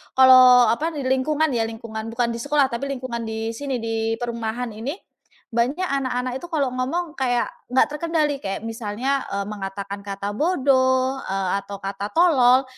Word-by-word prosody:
kalau 255 -1 +8
apa, 315 +8 -1
di 285 - -3
lingkungan 285 +4 +1
ya 230 -3 +1
lingkungan 225 -1 -7
bukan 235 0 0
di 230 - -5
sekolah 285 +2 +2
tapi 235 +4 -3
lingkungan 250 -3 -4
di 220 0 -3
sini, 270 +3 -4
di 225 0 -1
perumahan 235 0 -4
ini. 230 +8 -5 0.6
Banyak 245 +9 0
anak-anak 255 -3 -1
itu 345 - -9
kalau 290 -5 +1
ngomong 275 +7 -2
kayak 245 -2 +1 0.2
nggak 260 - +4
terkendali 300 -2 0
kayak 195 0 -3
misalnya, 230 +4 -2
eee, 200 0 -1
mengatakan 200 -1 -5
kata 200 0 -4
bodoh, 260 -4 +2
eee, 195 -1 -1 0.2
atau 200 - -7
kata 195 +1 -4
tolol, 265 -7 +5
250 Hz, 160 wpm, -23 LUFS, 225-275 Hz, 0.6 s, kalau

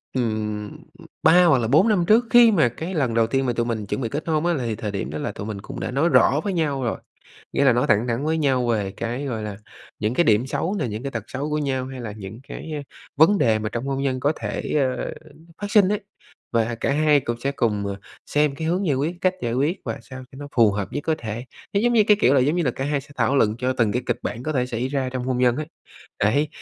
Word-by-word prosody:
ừm, 110 -3 -2 0.5
3 180 +3 +6
hoặc 160 -6 +5
là 115 -2 0
4 155 - +4
năm 195 -6 +2
trước, 230 +3 +5
khi 240 -1 +7
mà 155 - +3
cái 165 +10 -6
lần 135 -8 0
đầu 115 0 +3
tiên 135 +3 0
mà 120 - 0
tụi 120 0 -1
mình 110 -3 -3
chuẩn 100 - -3
bị 115 - -2
kết 150 +3 -4
hôn 155 0 +1
á, 175 - +2
là 130 -6 -2
thời 110 -3 -4
điểm 100 -8 -3
đó 75 - -5
là - - -3
tụi 100 - -7
mình 105 -2 -5
cũng - - -8
đã - - -3
nói 140 +7 +2
rõ 145 -2 +4
với 200 - -1
nhau 145 -6 0
rồi. 120 - -1 0.6
Nghĩa 140 - +2
là 135 - +6
nói 120 +1 +1
thẳng 110 +4 +3
thắn 120 +4 -1
với 160 +1 0
nhau 130 -5 +1
về 105 -5 0
cái, 120 +6 -4
gọi 115 -6 -3
là, 105 -2 -5 0.4
những 110 +3 -1
cái 175 - +3
điểm 110 0 +3
xấu 170 +7 -2
nè, - - -1
những 110 +2 -5
cái 140 0 -4
tật 115 -4 -4
xấu 140 +4 -4
của 150 - 0
nhau 135 -3 -1
hay 130 -1 -7
là 110 -3 -5
những 105 +3 -9
cái, 160 - -7
à, 145 - -4 0.3
vấn 165 +8 +5
đề 110 -7 +3
mà 110 0 -3
trong 120 +4 -4
hôn 135 0 -2
nhân 130 -2 -1
có 145 +3 +2
thể, - - -3 0.4
ờ, - - -4 0.5
phát 205 - -3
sinh 205 -3 +5
ấy. 210 0 0 0.5
Và 115 0 +1
cả 115 - -1
hai 150 0 +4
cũng 120 -2 -3
sẽ 140 +2 -1
cùng, 105 -6 0
ờ, 100 0 -3 0.3
xem 150 -1 +1
cái 160 +3 -3
hướng 185 +3 0
giải 145 - +2
quyết, 155 +6 -1
cách 185 0 +2
giải 115 - -1
quyết 145 +9 0
và - - -4
sao 130 -1 -10
cho - - -12
nó 145 - -7
phù 115 -3 +6
hợp 100 -1 -4
nhất 145 - -2
có 160 - +2
thể. 115 +1 -5 0.3
Nó 200 - +2
giống 240 +2 +2
như 220 -3 +5
cái, 210 - +6
kiểu 135 - +4
là, 135 - +5
giống 150 +7 +2
như 175 - +1
là 135 - +1
cả 135 +2 -4
hai 145 -1 0
sẽ 135 - -18
thảo 125 +3 +2
luận 110 -5 +3
cho 130 +1 0
từng 115 -5 +1
cái 125 +3 -1
kịch 120 - 0
bản 120 - -4
có 155 - -2
thể 125 -3 0
xảy 125 +1 -2
ra 135 -2 -1
trong 130 -1 -3
hôn 130 -1 -1
nhân 125 -1 +3
ấy. 155 - -3 0.5
Đấy, 140 +9 +2
130 Hz, 285 wpm, -23 LUFS, 115-155 Hz, 0.6 s, khi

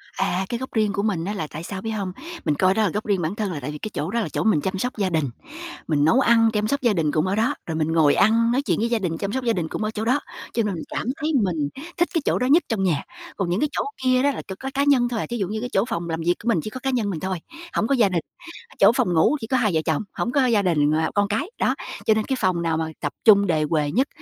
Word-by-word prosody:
À, 180 +2 0
cái 240 - -1
góc 260 - -6
riêng 215 -3 +1
của 200 - -1
mình 190 -6 -1
á 205 - -2
là 160 -7 -3
tại 155 +2 -8
sao, 190 +2 -6
biết 225 +2 -3
hông, 200 -4 -3 0.3
mình 150 - +2
coi 185 +4 +3
đó 220 - +1
là 205 - +2
góc 210 +5 -3
riêng 200 -4 +1
bản 165 +4 -2
thân 210 -3 -2
là 155 - -4
tại 140 +2 -5
vì 150 - -6
cái 215 - -5
chỗ 155 +5 -3
đó 235 - 0
là 225 - -2
chỗ - - -2
mình 215 -9 +3
chăm 190 +3 -2
sóc 245 +4 -3
gia 195 -2 +1
đình, 155 -5 0 0.6
mình 150 -2 +2
nấu 235 +11 +4
ăn, 230 -3 +5
chăm 210 0 0
sóc 280 +5 -1
gia 235 -4 +3
đình 160 -4 +1
cũng 155 +4 +1
ở 190 - 0
đó, 230 +7 +1
rồi 165 - -4
mình 160 0 0
ngồi 155 -3 +4
ăn, 230 +2 +4
nói 255 +3 +2
chuyện - - 0
với 230 +2 0
gia 235 -1 +1
đình, 170 -5 -2
chăm 200 +3 -3
sóc 260 +3 -2
gia 235 -2 +2
đình 170 -5 -2
cũng 215 - -4
ở 215 - -1
chỗ 220 0 -4
đó, 255 +5 +3 0.3
cho 230 - +1
nên 210 -2 -1
mình 165 - -5
cảm - - -3
thấy 305 - -2
mình 160 -7 -1 0.3
thích 345 0 +2
cái 330 - +1
chỗ - - +1
đó 250 - +1
nhất 315 +6 +5
trong 215 -4 0
nhà. 165 -7 +1 0.3
Còn 190 -4 -1
những 180 +3 0
cái 300 - +1
chỗ - - -1 0.2
kia 255 0 +3
đó 285 - +3
là - - -5
chỉ 190 - -5
có 270 - -4
cá 280 - +1
nhân 265 -4 +3
thôi, 235 -2 -2
à, - - -2
thí 240 - -2
dụ 195 -5 -1
như 215 +3 -3
cái 245 +2 -4
chỗ 195 +3 +3
phòng 170 0 -3
làm 165 0 -2
việc 175 +1 +3
của - - -7
mình 220 - +3
chỉ - - -4
có 255 - -7
cá 270 - -2
nhân 240 -6 0
mình 175 -5 -3
thôi, 185 +1 -2 0.4
hổng 220 - +1
có 275 - +2
gia 225 -6 +4
đình, 175 -3 0 0.6
chỗ - - +7
phòng 240 -8 +1
ngủ 165 - +4
chỉ 225 - -5
có 260 - +1
hai 220 -6 +2
vợ 160 - +3
chồng, 160 -3 0
hổng 240 - -2
có 275 -2 +3
gia 225 -4 +3
đình 150 -5 +2
và 160 +1 +1
con 205 0 +2
cái, 220 - -2
đó, - - +2 0.3
cho 220 - +5
nên 215 0 0
cái 265 - -1
phòng 180 -2 +1
nào 165 -1 0
mà 160 0 -1
tập 145 - -2
trung 200 -3 +7
đề 160 -4 +1
huề 150 -3 +1
nhất, 260 - +1
205 Hz, 330 wpm, -23 LUFS, 170-235 Hz, 0.6 s, chỗ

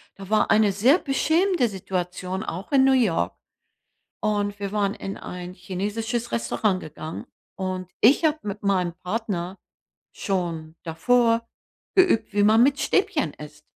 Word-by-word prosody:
Da 195 0 -11
war 215 - +2
eine 215 -1 +4
sehr 240 - +4
beschämende 320 +1 +2
Situation 185 0 -4
auch 185 - -6
in 275 -2 +5
New 270 - +5
York. 165 - +1 0.9
Und 205 -1 0
wir 200 - -3
waren 200 -1 0
in 195 - -6
ein 180 0 -7
chinesisches 210 +6 -3
Restaurant 215 -4 0
gegangen 155 +1 -8 0.3
und 185 -1 -4
ich 270 +8 +5
habe 310 0 +3
mit 205 0 -5
meinem 185 -4 +1
Partner 190 -2 -3 0.5
schon 165 -5 -3
davor 230 +7 +2 0.5
geübt, 370 - +3
wie 205 - +2
man 220 +3 +6
mit 280 +2 +2
Stäbchen 390 - +1
isst. 150 0 -11
205 Hz, 140 wpm, -24 LUFS, 180-235 Hz, 0.9 s, man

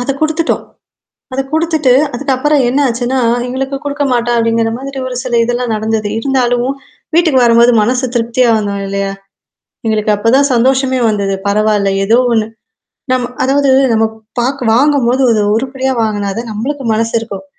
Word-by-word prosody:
அத 245 - -2
குடுத்துட்டோம். 315 +1 0 0.7
அத 260 - -1
குடுத்துட்டு, 315 -4 +1 0.2
அதுக்கப்புறம் 280 +3 0
என்னாச்சுன்னா, 255 -1 0 0.3
எங்களுக்கு 270 +2 -3
குடுக்கமாட்டா 275 -5 -1
அப்பிடிங்கிறமாதிரி 230 +4 -1
ஒரு 255 - -5
சில 240 -2 0
இதெல்லாம் 245 0 -2
நடந்தது. 215 0 -2
இருந்தாலும் 245 -1 0 0.5
வீட்டுக்கு 320 -6 +3
வரும்போது 235 +1 +5
மனசு 250 +4 0
திருப்தியா 240 +1 +1
வரணும் 200 -2 -2
இல்லயா! 195 0 -2 0.8
எங்களுக்கு 215 -1 0
அப்பதான் 235 +7 +2
சந்தோஷமே 260 +2 +2
வந்தது. 200 -2 -1
பரவால்ல. 210 -1 +1
ஏதோ 220 +4 +3
ஒன்னு. 220 -2 +2 0.7
நம்ம 250 -1 0
அதாவது 275 +1 +2 0.2
நம்ம 225 0 +2 0.3
பாக் 260 +3 -1
வாங்கும்போது 265 -1 +2
அது 215 -2 +2
உருப்படியா 265 +2 -2
வாங்குனாதான், 215 +1 -2
நம்மளுக்கு 265 +7 -4
மனசு 225 +1 -1
இருக்கும். 200 -4 -8
245 Hz, 130 wpm, -13 LUFS, 225-270 Hz, 0.8 s, வரும்போது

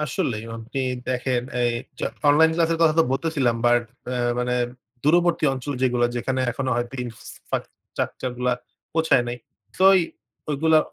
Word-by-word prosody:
আসলেই 125 -6 -2
আপনি 115 +5 -6 0.3
দেখেন 125 -1 0 0.2
এই 120 - +3 0.6
অনলাইন 160 +3 +6
ক্লাস 165 -1 +2
এর 165 - -1
কথা 160 -2 +5
তো - - +4
বলতেছিলাম 135 -5 +1
বাট 120 0 +4 0.3
আ - - -1 0.2
মানে 125 0 0 0.5
দূরবর্তী 175 +2 +3
অঞ্চল 135 +2 -4
যেগুলো 125 -2 +2
যেখানে 130 +2 -1
এখনো 130 +2 -2
হয়তো 120 +2 -3
ইনফ্রাস্ট্রাকচার 120 +2 -5
গুলো 125 0 +1 0.4
পৌঁছায় 160 -6 +3
নাই। 120 - -3 0.4
সো 190 - +4 0.7
ঐগুলো 155 +2 +4
130 Hz, 135 wpm, -24 LUFS, 120-160 Hz, 0.7 s, অনলাইন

